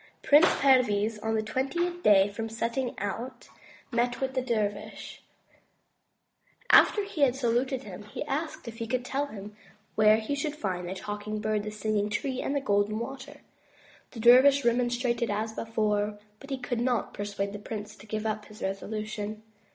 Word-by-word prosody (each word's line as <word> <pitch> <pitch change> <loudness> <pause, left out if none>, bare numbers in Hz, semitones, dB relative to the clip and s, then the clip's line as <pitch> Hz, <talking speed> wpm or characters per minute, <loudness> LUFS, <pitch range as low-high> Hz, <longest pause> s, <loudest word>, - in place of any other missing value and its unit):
Prince 295 +3 +7
Perviz 225 -5 +3
on 220 +1 -1
the 215 - 0
twentieth 340 +10 -2
day 195 - +6
from 220 +2 -5
the 225 - -10
setting 235 +2 -2
out, 215 +6 -5 0.4
met 245 0 0
with 265 -1 -2
the 260 - 0
dervish. 215 -5 -3 1.5
After 415 - +6
he 395 -6 -5
had 260 -3 +4
saluted 260 +1 0
him, 200 0 -9
he 210 - -5
asked 295 -1 -4
if 230 -1 -7
he 230 - -3
could 250 +1 -1
tell 280 +2 -1
him 210 -4 -9 0.4
where 215 0 +5
he 220 +5 -3
should 290 +1 -2
find 180 -9 -3
the 190 - -4
Talking 210 +2 -5
Bird, 215 0 0
the 210 - -5
Singing 215 -1 -1
Tree, 260 +4 -2
and 280 - -2
the 280 - +1
Golden 205 -3 +1
Water. 265 +4 -7 0.7
The 230 - -10
dervish 260 +4 +7
remonstrated 240 0 +1
as 215 +2 -2
before, 210 -2 -1 0.2
but 275 - -12
he 270 - -2
could 245 -2 -3
not 245 -3 0
persuade 200 0 -3
the 205 - -6
prince 210 0 -7
to 210 - -15
give 215 +1 -3
up 215 -1 -2
his 215 +1 -11
resolution. 215 +2 -4
225 Hz, 175 wpm, -28 LUFS, 210-260 Hz, 1.5 s, Prince